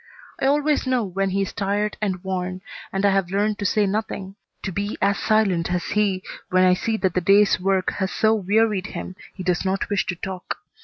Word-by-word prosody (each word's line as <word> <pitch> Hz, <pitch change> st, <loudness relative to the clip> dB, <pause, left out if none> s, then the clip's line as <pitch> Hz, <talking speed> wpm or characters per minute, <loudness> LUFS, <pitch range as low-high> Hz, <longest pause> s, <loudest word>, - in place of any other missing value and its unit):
I 270 Hz, -, +2 dB
always 295 Hz, 0 st, +2 dB
know 255 Hz, -2 st, +2 dB
when 195 Hz, 0 st, -1 dB
he 195 Hz, +1 st, 0 dB
is 195 Hz, -, -5 dB
tired 205 Hz, 0 st, -1 dB
and 190 Hz, -3 st, -2 dB
worn, 185 Hz, -1 st, -3 dB, 0.3 s
and 195 Hz, +1 st, 0 dB
I 200 Hz, -, +5 dB
have 195 Hz, -2 st, +1 dB
learned 205 Hz, +2 st, 0 dB
to 205 Hz, -, +1 dB
say 210 Hz, +1 st, +2 dB
nothing, 195 Hz, -1 st, -3 dB, 0.3 s
to 190 Hz, -, -2 dB
be 200 Hz, +3 st, -3 dB
as 200 Hz, 0 st, +2 dB
silent 195 Hz, -6 st, +2 dB
as 180 Hz, -1 st, -1 dB
he 200 Hz, -3 st, +1 dB, 0.3 s
when 185 Hz, 0 st, +4 dB
I 185 Hz, 0 st, +6 dB
see 220 Hz, +4 st, -1 dB
that 190 Hz, -4 st, 0 dB
the 180 Hz, -, +1 dB
day's 200 Hz, +3 st, +5 dB
work 190 Hz, 0 st, +1 dB
has 190 Hz, 0 st, 0 dB
so 220 Hz, 0 st, +3 dB
wearied 210 Hz, -1 st, +1 dB
him 185 Hz, -, -6 dB, 0.2 s
he 185 Hz, -, -6 dB
does 180 Hz, -1 st, 0 dB
not 195 Hz, +2 st, -1 dB
wish 205 Hz, -, +1 dB
to 180 Hz, -, -2 dB
talk. 185 Hz, +1 st, -5 dB
195 Hz, 215 wpm, -23 LUFS, 185-210 Hz, 0.3 s, I